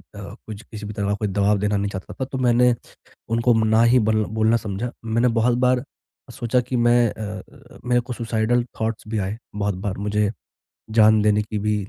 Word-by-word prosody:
अ, 100 Hz, 0 st, -8 dB
कुछ 105 Hz, -1 st, -7 dB
किसी 105 Hz, -3 st, -9 dB
भी 105 Hz, -, -6 dB
तरह 100 Hz, -1 st, -2 dB
का 100 Hz, -, +1 dB
कोई 105 Hz, +1 st, -2 dB
दवाब 100 Hz, +1 st, +1 dB
देना 105 Hz, 0 st, 0 dB
नहीं 100 Hz, 0 st, -1 dB
चाहता 95 Hz, -2 st, -7 dB
था, 130 Hz, -, -4 dB
तो 135 Hz, +1 st, -6 dB
मैंने 125 Hz, -1 st, +4 dB, 0.6 s
उनको 115 Hz, +2 st, +2 dB
ना 110 Hz, +1 st, +4 dB
ही 120 Hz, +2 st, +5 dB
बल 110 Hz, -1 st, +2 dB
बोलना 110 Hz, +1 st, +4 dB
समझा। 110 Hz, +2 st, -4 dB
मैंने 115 Hz, +2 st, +2 dB
बहुत 120 Hz, +1 st, +2 dB
बार 125 Hz, 0 st, +2 dB, 0.5 s
सोचा 120 Hz, +1 st, 0 dB
कि 125 Hz, +1 st, -3 dB
मैं 120 Hz, 0 st, +4 dB
अ 105 Hz, -3 st, -6 dB, 0.3 s
अ, -, -, -14 dB
मेरे 125 Hz, 0 st, +2 dB
को 120 Hz, +1 st, -7 dB
सुसाइडल 115 Hz, +1 st, 0 dB, 0.2 s
थॉट्स 110 Hz, 0 st, -2 dB
भी 110 Hz, 0 st, -2 dB
आए, 100 Hz, +1 st, -2 dB, 0.2 s
बहुत 105 Hz, -1 st, -1 dB
बार 95 Hz, -1 st, -2 dB
मुझे 105 Hz, 0 st, 0 dB, 0.6 s
जान 110 Hz, -1 st, +5 dB
देने 105 Hz, 0 st, +3 dB
की 105 Hz, 0 st, -4 dB
भी 105 Hz, +1 st, 0 dB
110 Hz, 205 wpm, -22 LUFS, 105-120 Hz, 0.6 s, ही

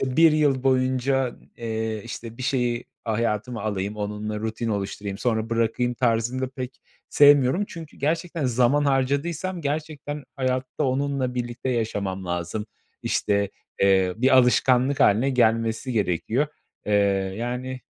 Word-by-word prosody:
işte 130 Hz, -1 st, -2 dB
1 165 Hz, -1 st, +7 dB
yıl 145 Hz, -4 st, +2 dB
boyunca, 130 Hz, 0 st, +1 dB, 0.2 s
eee, 110 Hz, -2 st, -3 dB
işte, 115 Hz, 0 st, -7 dB
bir -, -, -5 dB
şeyi 125 Hz, -2 st, 0 dB, 0.2 s
a 110 Hz, -, -1 dB
hayatıma 115 Hz, 0 st, -1 dB
alayım, 100 Hz, -1 st, -2 dB
onunla 105 Hz, +1 st, -3 dB
rutin 110 Hz, +1 st, -3 dB
oluşturayım, 100 Hz, -1 st, -3 dB
sonra 115 Hz, -1 st, -1 dB
bırakayım 115 Hz, +2 st, 0 dB
tarzını 120 Hz, +1 st, 0 dB
da 130 Hz, -, -1 dB
pek 130 Hz, -1 st, -7 dB, 0.3 s
sevmiyorum. 145 Hz, +5 st, +5 dB
Çünkü 165 Hz, -3 st, -10 dB
gerçekten 165 Hz, +2 st, -1 dB
zaman 130 Hz, +4 st, +3 dB
harcadıysam 145 Hz, +7 st, 0 dB
gerçekten 150 Hz, -1 st, -4 dB
hayatta 130 Hz, +2 st, -1 dB
onunla 135 Hz, -1 st, 0 dB
birlikte 120 Hz, +1 st, -4 dB
yaşamam 100 Hz, -5 st, -2 dB
lazım. 90 Hz, +4 st, -3 dB, 0.4 s
İşte, 100 Hz, -1 st, 0 dB, 0.3 s
eee, 95 Hz, -2 st, +4 dB
bir 130 Hz, +3 st, +4 dB
alışkanlık 130 Hz, +2 st, +3 dB
hâline 115 Hz, +7 st, +4 dB
gelmesi 115 Hz, 0 st, +1 dB
gerekiyor. 110 Hz, -, 0 dB, 0.4 s
Eee, 105 Hz, -, 0 dB, 0.4 s
yani, 125 Hz, +2 st, -4 dB
125 Hz, 130 wpm, -24 LUFS, 110-135 Hz, 0.4 s, 1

